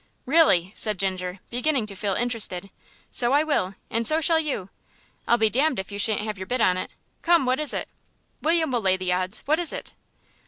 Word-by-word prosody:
"Really!" 245 - +3
said 210 -2 +1
Ginger, 185 -1 -2
beginning 250 0 0
to 200 -2 -7
feel 195 -1 -2
interested, 215 -6 0 0.4
"so 245 +1 0
I 290 +2 +4
will, 195 -11 -1 0.2
and 230 +1 +1
so 310 +1 +3
shall 325 +1 +3
you. 265 - -3 0.6
I'm 235 - +4
damned 240 +7 +2
if 190 +1 -5
you 200 - -5
shan't 215 0 +3
have 210 -2 -5
your 190 - -6
bit 250 +4 -1
on. 185 -4 +1 0.3
Come, 340 -4 +3
what 255 +2 0
is 305 -2 +1
it? - - -3 0.5
William 320 -2 +2
will 240 -2 0
lay 190 -2 +2
the 185 -1 -1
odds. 185 +2 -2
What 310 +3 +1
is 345 - +1
it?" - - -7
225 Hz, 200 wpm, -24 LUFS, 190-290 Hz, 0.6 s, I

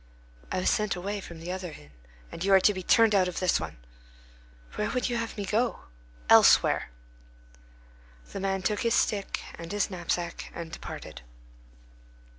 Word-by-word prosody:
"I - - -1
was 185 - +2
sent 210 -2 0
away 200 +3 -4
from 170 -3 -10
the 170 +2 -5
other 185 -2 -5
inn." 75 - -14 0.4
"And 165 - -6
you 195 - +1
are - - +8
to 210 - +4
be 190 - -5
turned 225 +4 +4
out 190 -2 +4
of 180 - -4
this 185 -1 +2
one." - - -6 1.0
"Where 210 - -2
would 250 -1 -1
you 240 - -1
have 230 -1 -4
me 205 - -3
go?" 230 +5 0 0.5
"Elsewhere." - - +6 1.4
The - - -5
man 195 -1 -1
took 210 0 0
his 230 0 +1
stick 200 -2 0 0.2
and 165 0 -7
his 205 0 0
knapsack 175 -1 -3
and 165 -1 -6
departed. 65 - -8
195 Hz, 170 wpm, -28 LUFS, 175-210 Hz, 1.4 s, are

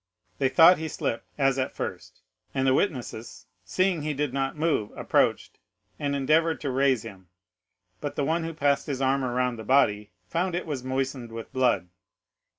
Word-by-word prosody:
They 135 - +2
thought 165 +5 +7
he 160 - -3
slipped, 115 -6 -3
as 135 -2 +2
at 130 - -2
first, - - -6 0.3
and 135 - +1
the 130 - +4
witnesses, 130 - -2 0.2
seeing 185 -3 +1
he 150 0 -2
did 145 -2 -1
not 135 +1 -2
move, 155 -9 0
approached - - +1 0.4
and 140 -1 -1
endeavored 155 +4 +2
to 140 - -2
raise 130 -3 +2
him, 95 -2 -11 0.7
but 145 - -5
the 145 - 0
one 165 +3 0
who 165 0 -5
passed 140 -2 +1
his 140 -3 -3
arm 135 0 +1
around 125 -1 0
the 110 - -7
body 105 -4 +2 0.2
found 175 +1 -1
it 175 - -3
was 145 -6 -4
moistened 130 -2 -3
with 115 0 -8
blood. 120 -9 +1
135 Hz, 175 wpm, -26 LUFS, 125-155 Hz, 0.7 s, thought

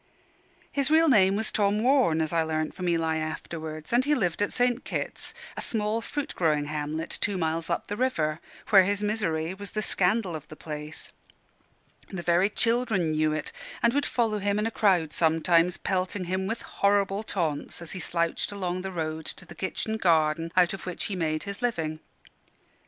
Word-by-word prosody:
His 280 -1 +1
real 320 +1 +5
name 195 -8 +5
was 220 +1 -1
Tom 210 +1 +2
Warne, 250 - +4
as 155 +1 -1
I 165 - +3
learnt 155 -1 -1
from 180 -2 -2
Eli 165 -1 +1
afterwards; 155 +1 -5
and 245 +2 +5
he 295 +2 +3
lived 180 - 0
at 205 - +1
St. 245 0 +1
Kit's, - - -4 0.2
a - - -4
small 215 0 -1
fruit 290 +4 -4
growing 155 -4 +2
hamlet 155 +2 -3
two 205 -2 0
miles 165 0 -1
up 170 - -1
the 205 - -4
river, 160 -11 0 0.3
where 195 -3 +9
his 205 +2 0
misery 185 -6 -1
was 200 +1 -7
the 215 - +1
scandal 190 -1 +1
of 150 -1 -7
the 155 - -10
place. 150 0 -6 1.0
The 180 -3 -5
very 175 +3 +3
children 230 -7 +1
knew 155 0 +2
it, 155 - -3 0.3
and 235 0 +4
would 285 +1 +1
follow 225 -3 +1
him 200 0 0
in 210 - +1
a 225 - -1
crowd 180 -8 +2
sometimes, 165 +2 +3
pelting 185 0 -1
him 185 +2 -2
with 225 +2 -3
horrible 200 0 +1
taunts 165 -9 -2
as 170 -1 -4
he 185 - -5
slouched 170 +2 -1
along 185 -2 -2
the 190 +1 -4
road 160 -2 -3
to 185 - -7
the - - -11
kitchen 220 +3 -2
garden 165 -3 +2
out 180 0 +5
of 195 - -7
which 180 - -3
he 200 - -2
made 155 -3 -1
his 200 +3 -6
living. 160 -10 -1
185 Hz, 190 wpm, -27 LUFS, 160-210 Hz, 1.0 s, where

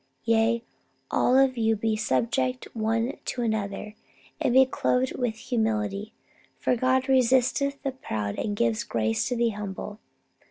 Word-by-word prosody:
Yea, 230 0 +2 0.5
all 255 - +3
of 265 -2 +4
you 225 0 +3
be 220 +1 0
subject 130 - 0
one 225 +2 -1
to 245 - -3
another, 210 -2 -2 0.5
and - - +1
be 265 0 +8
clothed 255 0 0
with 245 -3 -1
humility; 220 -3 -1 0.5
for - - +1
God 260 +2 +1
resisteth 265 +2 +2
the 275 - -1
proud 105 - -4
and 205 -1 -2
giveth 115 - 0
grace 110 -1 0
to 250 - -1
the 235 0 +2
humble 205 0 -6
225 Hz, 145 wpm, -26 LUFS, 205-255 Hz, 0.5 s, be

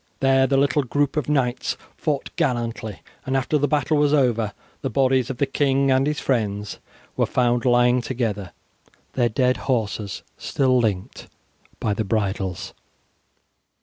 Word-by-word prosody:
There 135 0 +4
the 135 - +2
little 140 +1 +3
group 145 +2 0
of 150 -3 -1
knights 130 -4 0 0.2
fought 145 -4 -2
gallantly, 115 -4 -2 0.2
and 130 0 0
after 140 +3 +1
the 145 - +2
battle 150 +1 +1
was 145 0 +3
over, 115 -6 +2 0.3
the - - -2
bodies 130 +1 +2
of 130 - -4
the 140 - +2
king 135 0 +1
and 130 +1 +3
his 150 -1 -1
friends 105 -5 -1 0.4
were - - +1
found 120 0 +1
lying 125 0 +4
together, 115 -6 -3 0.6
their 120 -2 +2
dead 125 +3 +1
horses 105 -5 -1 0.2
still 130 -2 +2
linked 100 -5 -2 0.5
by 105 - 0
the 110 - -1
bridles. 95 -3 -2
125 Hz, 150 wpm, -23 LUFS, 110-135 Hz, 0.6 s, There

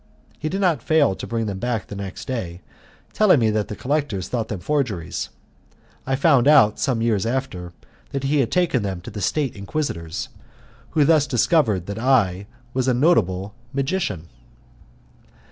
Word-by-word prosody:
He 155 - -2
did 195 +4 -2
not 170 - +2
fail 150 -5 +3
to - - -7
bring 115 -1 -1
them 100 -2 -4
back 120 -2 -2
the 105 - -8
next 100 -1 -6
day, 95 -9 -4 0.5
telling 195 -8 +5
me 110 -2 +2
that 105 -1 0
the 105 - -6
collector 140 -6 -1
thought 115 +4 -3
them 105 - -4
forgeries. 115 - -2 0.8
I 135 - +1
found 140 -2 +4
out, 125 -9 +6
some 120 -4 0
years 110 -4 +1
after, 115 -8 -3 0.4
that 135 -1 -4
he 145 +2 +2
had 125 - +2
taken 175 -9 +2
them 95 -3 -3
to - - -9
the 105 - -6
State 135 - 0
Inquisitors, 100 - -4 0.7
who 150 - +5
thus 150 -2 +4
discovered 120 - +2
that 100 +3 -5
I 105 -7 +2 0.3
was 130 0 0
a 130 - +3
notable 100 - +2 0.2
magician. 135 - -2
120 Hz, 165 wpm, -22 LUFS, 100-145 Hz, 0.8 s, out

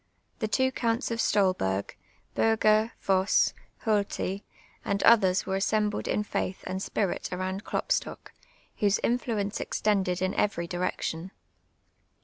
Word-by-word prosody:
The 215 - -1
two 260 +5 +2
Counts 235 0 -1
Siolberg» 185 - +1 0.4
Bi'irirer, 220 0 +3
Voss, 190 0 +3 0.3
Holtv, 200 -2 0 0.4
and 200 0 -1
others 190 -5 +5
were 190 - -1
assembled 210 +2 0
in 210 - 0
faith 190 -2 -3
and 185 0 -3
t^pirit 195 0 -2
around 185 +2 -3
Klopstock, - - -2 0.5
whose 205 -2 +2
influence 225 -4 -1
extended 190 -4 0
in 185 +1 0
every 200 -5 0
direction. 175 0 -3
200 Hz, 115 wpm, -28 LUFS, 185-215 Hz, 0.5 s, others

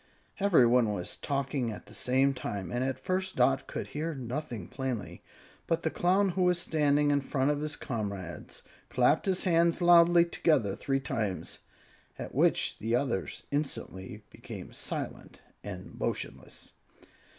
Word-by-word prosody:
Everyone 125 - +4
was 90 -3 -5
talking 135 -3 -1
at 105 - -9
the - - -15
same 135 +2 +2
time, 100 -7 -5
and 120 +1 0
at 130 -1 -1
first 185 +5 -2
Dot 130 +2 +2
could - - -5
hear 155 +2 -3
nothing 125 - -5
plainly; 130 -4 -4 0.5
but 165 0 0
the 160 - 0
Clown 190 +3 +3
who 185 +1 -1
was 180 -1 +4
standing 150 -3 +2
in 145 -1 +2
front 135 +1 +1
of 145 0 -2
his 150 -1 -2
comrades 100 -7 -5 0.3
clapped 130 +8 +3
his 190 -1 +1
hands 170 -2 +3
loudly 175 -1 +7
together 150 - +1
three 135 -1 -1
times, 110 -7 -3 0.6
at - - -7
which - - +2
the 115 +2 0
others 125 -7 -2
instantly 105 -8 -3
became - - -9
silent - - -6 0.2
and 95 -2 -8
motionless. - - -5
135 Hz, 145 wpm, -30 LUFS, 115-165 Hz, 0.6 s, loudly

